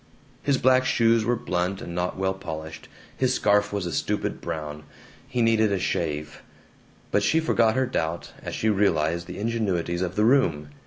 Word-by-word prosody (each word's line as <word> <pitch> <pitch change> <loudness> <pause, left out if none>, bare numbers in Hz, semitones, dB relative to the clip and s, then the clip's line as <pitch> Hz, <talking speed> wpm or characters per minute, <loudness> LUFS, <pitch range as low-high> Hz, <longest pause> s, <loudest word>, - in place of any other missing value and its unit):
His 140 -2 +2
black 130 0 +4
shoes 115 -3 +3
were 120 +2 +2
blunt 95 -4 -2
and 85 - -7
not 90 +1 -2
well 95 0 0
polished. 80 -4 -7 0.3
His 130 -1 +1
scarf 105 0 +2
was 100 -3 -2
a 85 - -3
stupid - - -2
brown. 75 -1 -5 0.5
He 125 -3 0
needed 110 -2 +3
a 100 - +1
shave. 75 -4 -2 0.7
But - - +3
she 160 - +3
forgot 115 -8 +2
her 130 0 +2
doubt 85 -9 -3
as - - -5
she 110 - -1
realized 85 -5 +1
the 90 - -7
ingenuities 100 -6 -1
of 90 - -2
the 105 - +3
room. 85 - +2
100 Hz, 175 wpm, -25 LUFS, 85-115 Hz, 0.7 s, black